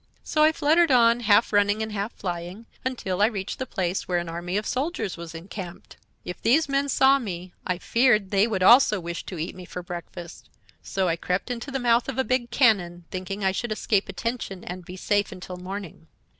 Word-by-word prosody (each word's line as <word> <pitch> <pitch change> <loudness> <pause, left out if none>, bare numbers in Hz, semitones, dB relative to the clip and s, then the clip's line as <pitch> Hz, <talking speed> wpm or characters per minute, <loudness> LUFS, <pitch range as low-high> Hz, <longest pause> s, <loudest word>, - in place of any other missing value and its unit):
So 305 - 0
I 310 +1 +6
fluttered 320 +2 +3
on, 235 -2 +5
half 220 -1 +3
running 205 +1 +3
and 220 - -5
half 205 +2 -3
flying, 180 +3 -6 0.2
until 200 -7 -2
I 210 - +6
reached 200 -4 -4
the 260 - -3
place 185 -2 -2
where 180 - +1
an 175 -1 -3
army 175 +3 -3
of 210 - -2
soldiers 270 - -2
was 170 -1 -9
encamped. 175 +1 -8 0.3
If 180 - -7
these 290 +7 +3
men 280 0 0
saw 270 +1 +5
me 180 -6 -6
I 180 -1 0
feared 215 -2 +2
they 200 +2 +4
would 195 -5 -1
also 230 -1 +7
wish 170 -1 -5
to 185 - -6
eat 160 +2 -4
me 185 - -10
for 180 0 -7
breakfast; 175 0 -9 0.3
so 190 -1 -1
I 165 -1 0
crept 180 +7 -2
into 245 +3 -5
the 270 - -2
mouth 240 0 +2
of 265 - -4
a 265 - +2
big 255 -2 0
cannon, 195 -9 +2
thinking 190 +2 -5
I 190 - +3
should 225 +4 -3
escape 210 -2 0
attention 195 -2 -4
and 180 +1 -7
be 180 +2 -9
safe 205 +2 0
until 185 -1 -8
morning. 185 -3 -8
200 Hz, 210 wpm, -25 LUFS, 180-240 Hz, 0.3 s, also